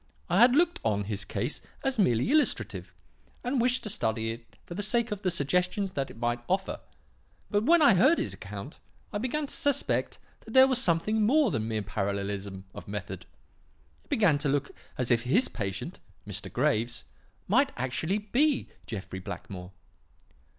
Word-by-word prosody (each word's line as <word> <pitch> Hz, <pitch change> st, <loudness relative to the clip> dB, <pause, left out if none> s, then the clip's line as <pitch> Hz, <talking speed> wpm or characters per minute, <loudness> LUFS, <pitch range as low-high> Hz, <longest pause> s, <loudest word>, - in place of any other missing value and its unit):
I 180 Hz, -, +4 dB
had 245 Hz, +2 st, +7 dB
looked 345 Hz, +2 st, +3 dB
on 105 Hz, -2 st, +1 dB
his 105 Hz, 0 st, -3 dB
case -, -, -2 dB, 0.2 s
as 270 Hz, -3 st, 0 dB
merely 125 Hz, -, +3 dB
illustrative, 305 Hz, 0 st, 0 dB, 0.5 s
and 250 Hz, 0 st, 0 dB
wished 250 Hz, +1 st, +2 dB
to 215 Hz, -, -3 dB
study 110 Hz, -, -1 dB
it 115 Hz, -2 st, -11 dB
for -, -, -8 dB
the 200 Hz, -, -3 dB
sake 235 Hz, +2 st, +1 dB
of 205 Hz, -1 st, -3 dB
the 185 Hz, -, +1 dB
suggestions 180 Hz, +5 st, 0 dB
that 135 Hz, -5 st, -2 dB
it -, -, -12 dB
might 120 Hz, +1 st, 0 dB
offer. -, -, 0 dB, 0.7 s
But 205 Hz, +2 st, +2 dB
when 335 Hz, +2 st, +6 dB
I -, -, +8 dB
had 195 Hz, -, +5 dB
heard 275 Hz, -, +5 dB
his -, -, -2 dB
account, -, -, -8 dB, 0.3 s
I 205 Hz, -, -1 dB
began 275 Hz, +6 st, -1 dB
to -, -, -4 dB
suspect 285 Hz, -3 st, +1 dB, 0.2 s
that 225 Hz, -, -11 dB
there 260 Hz, 0 st, +9 dB
was 260 Hz, -2 st, +2 dB
something 200 Hz, +5 st, +2 dB
more 260 Hz, +3 st, +4 dB
than 110 Hz, -6 st, -1 dB
mere 110 Hz, -2 st, -2 dB
parallelism 100 Hz, -1 st, -3 dB
of -, -, -10 dB
method. 100 Hz, -2 st, -6 dB, 0.8 s
It -, -, -32 dB
began 175 Hz, -10 st, +3 dB
to 145 Hz, -1 st, 0 dB
look 145 Hz, +1 st, 0 dB, 0.3 s
as 125 Hz, -1 st, 0 dB
if 115 Hz, -1 st, +4 dB
his 145 Hz, -, +3 dB
patient, 95 Hz, -4 st, -5 dB, 0.3 s
Mr. -, -, -6 dB
Graves, 115 Hz, +3 st, 0 dB, 0.4 s
might -, -, +3 dB
actually 145 Hz, +9 st, -1 dB
be 255 Hz, +7 st, +1 dB, 0.2 s
Jeffrey 95 Hz, -3 st, -6 dB
Blackmore. 90 Hz, 0 st, -7 dB
175 Hz, 175 wpm, -28 LUFS, -, 0.8 s, there